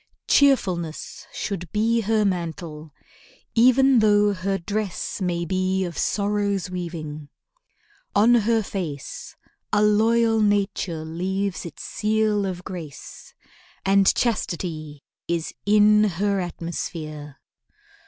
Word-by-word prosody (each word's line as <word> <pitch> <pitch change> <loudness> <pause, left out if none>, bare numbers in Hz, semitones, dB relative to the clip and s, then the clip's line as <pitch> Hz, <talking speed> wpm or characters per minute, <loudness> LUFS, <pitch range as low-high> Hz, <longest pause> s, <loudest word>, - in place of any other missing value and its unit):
Cheerfulness 185 - +1
Should 180 -5 -5
be 230 +2 +2
her 215 0 +1
mantle, 165 -4 -4 0.6
even 255 +2 +5
though 205 -1 +4
her 195 +1 -1
dress 200 +1 -3
May 175 -2 -1
be 185 +2 0
of 170 -2 -6
Sorrow's 200 0 -1
weaving. 155 -5 -6 0.9
On 225 +4 +5
her 225 -1 +3
face 165 -9 -6 0.4
A 210 - +3
loyal 225 +1 +3
nature 195 -5 0
leaves 185 +3 -3
its - - -10
seal 215 -1 0
of 180 -1 -5
grace, 170 -8 -9 0.5
And 195 0 +5
chastity 160 - -2 0.2
is 170 -1 -2
in 210 0 +5
her 200 +1 0
atmosphere. 160 -4 -6
195 Hz, 105 wpm, -24 LUFS, 170-210 Hz, 0.9 s, even